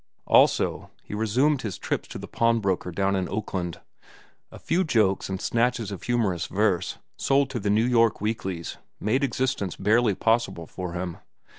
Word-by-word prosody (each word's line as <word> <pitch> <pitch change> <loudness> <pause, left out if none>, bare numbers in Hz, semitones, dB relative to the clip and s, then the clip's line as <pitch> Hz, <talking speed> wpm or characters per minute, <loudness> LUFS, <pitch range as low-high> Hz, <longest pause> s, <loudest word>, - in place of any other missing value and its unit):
Also, - - +3
he - - -9
resumed 125 +7 +2
his 105 -6 -4
trips - - -3
to - - -7
the - - -8
pawn 115 0 +2
broker 95 -3 -1
down 100 +2 0
in 95 -1 -1
Oakland. 95 -4 -3 0.7
A - - -10
few 175 +4 0
jokes 105 - +1
and 95 -1 -3
snatches 115 -1 0
of 100 - -6
humorous 105 -8 0
verse, 95 -3 0 0.2
sold 135 -1 +2
to 125 - -2
the 100 -1 -1
New 110 +3 +3
York 115 -3 +3
weeklies, 95 -5 -3 0.2
made 120 +7 +1
existence 125 -7 -1
barely 105 +1 +2
possible 115 -7 +1
for 90 +1 -6
him. 90 -1 -4
105 Hz, 165 wpm, -26 LUFS, 95-120 Hz, 0.7 s, Also